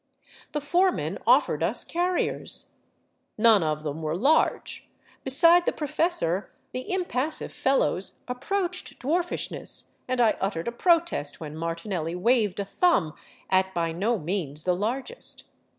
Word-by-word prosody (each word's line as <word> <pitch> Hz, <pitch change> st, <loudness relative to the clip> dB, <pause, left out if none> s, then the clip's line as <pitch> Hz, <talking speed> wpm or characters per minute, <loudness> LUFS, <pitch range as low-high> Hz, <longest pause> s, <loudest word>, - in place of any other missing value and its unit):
The 295 Hz, -, -1 dB
foreman 355 Hz, +6 st, +1 dB
offered -, -, +4 dB
us -, -, 0 dB
carriers. 355 Hz, +1 st, -1 dB, 0.7 s
None 220 Hz, -2 st, +6 dB
of 155 Hz, -1 st, -1 dB
them 155 Hz, +1 st, -4 dB
were 155 Hz, 0 st, -2 dB
large; 285 Hz, -, +1 dB, 0.3 s
beside 335 Hz, +6 st, +5 dB
the -, -, +4 dB
professor 290 Hz, -, -1 dB, 0.2 s
the 255 Hz, +6 st, -5 dB
impassive 320 Hz, -6 st, -1 dB
fellows 265 Hz, -8 st, +1 dB
ap 250 Hz, +1 st, -6 dB
proached 370 Hz, -8 st, -2 dB
dwarfishness, 340 Hz, +6 st, -1 dB, 0.2 s
and 255 Hz, 0 st, -1 dB
I 230 Hz, -3 st, +4 dB
uttered 195 Hz, -3 st, -2 dB
a -, -, 0 dB
protest 335 Hz, -, +1 dB
when 155 Hz, -2 st, -7 dB
Martinelli 165 Hz, +1 st, -3 dB
waved 210 Hz, 0 st, +2 dB
a 200 Hz, -, -1 dB
thumb 200 Hz, -, +2 dB, 0.4 s
at 190 Hz, 0 st, +2 dB
by 165 Hz, -1 st, 0 dB
no 210 Hz, +8 st, 0 dB
means 155 Hz, -4 st, -3 dB
the 180 Hz, -1 st, +1 dB
largest. 255 Hz, -, -3 dB
230 Hz, 135 wpm, -26 LUFS, -, 0.7 s, None